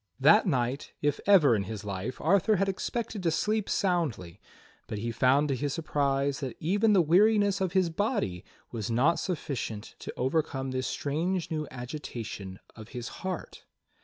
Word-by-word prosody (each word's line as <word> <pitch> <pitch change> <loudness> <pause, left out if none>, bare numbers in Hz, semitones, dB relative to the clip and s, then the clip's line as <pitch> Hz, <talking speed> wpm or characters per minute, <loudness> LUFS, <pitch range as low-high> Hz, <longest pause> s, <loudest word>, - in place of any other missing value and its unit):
That 205 +10 +6
night, 130 -3 -1
if 145 -1 +1
ever 160 - +6
in 100 -2 -1
his 105 0 -6
life, 100 +5 -4
Arthur 200 +6 +3
had 195 +1 +1
expected 215 +2 -3
to 170 - +1
sleep 210 +5 0
soundly, 145 - -1 0.5
but 105 - -4
he 115 +3 -3
found 130 +6 +3
to 135 - +1
his 140 +2 -2
surprise 140 -3 0
that 130 -4 -5
even 205 +6 +2
the 185 -3 +5
weariness 200 +4 +4
of 185 -2 0
his 185 -3 +2
body 185 - -1 0.3
was 110 -3 -4
not 130 +9 +3
sufficient 130 - -4
to - - -6
overcome 135 -1 -1
this 130 -1 -2
strange 165 +5 -2
new 155 -2 -2
agitation 120 -7 -6 0.2
of 110 0 -11
his 115 -2 -5
heart. 185 -2 -5
145 Hz, 160 wpm, -29 LUFS, 120-185 Hz, 0.5 s, That